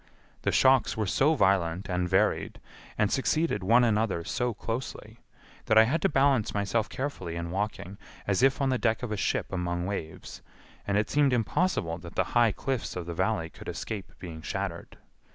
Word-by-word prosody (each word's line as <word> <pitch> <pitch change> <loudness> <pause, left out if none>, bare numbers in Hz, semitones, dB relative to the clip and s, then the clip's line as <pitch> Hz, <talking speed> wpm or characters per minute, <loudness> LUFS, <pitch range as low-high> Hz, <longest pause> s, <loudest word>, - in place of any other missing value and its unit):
The - - 0
shocks 130 -4 +4
were 110 - 0
so 145 - +2
violent 95 - +1
and 90 -1 -1
varied, 95 - +1 0.4
and 105 - +2
succeeded 155 - +1
one 115 +6 +4
another 110 -6 +1
so 120 +7 -1
closely, 115 +3 -6 0.5
that 110 - +4
I 110 - +9
had 145 +9 0
to - - +3
balance 135 -7 +2
myself 105 +2 0
carefully 110 -12 -4
in 85 0 -4
walking 100 0 -4 0.3
as 100 +2 +1
if 135 +1 +3
on 135 - +2
the 130 -1 +1
deck 115 +1 0
of 120 - -3
a - - 0
ship 95 - -1
among 85 -1 -2
waves, 95 -5 -6 0.5
and 100 0 +1
it 105 - 0
seemed 145 -2 +3
impossible 115 - 0
that 85 -1 -11
the - - +2
high 120 -3 +5
cliffs 130 +4 -3
of 90 -2 -4
the 85 - -5
Valley 90 -2 -1
could - - -9
escape 105 -3 -5
being 80 -3 -8
shattered. 95 0 -5
105 Hz, 185 wpm, -28 LUFS, 90-125 Hz, 0.5 s, I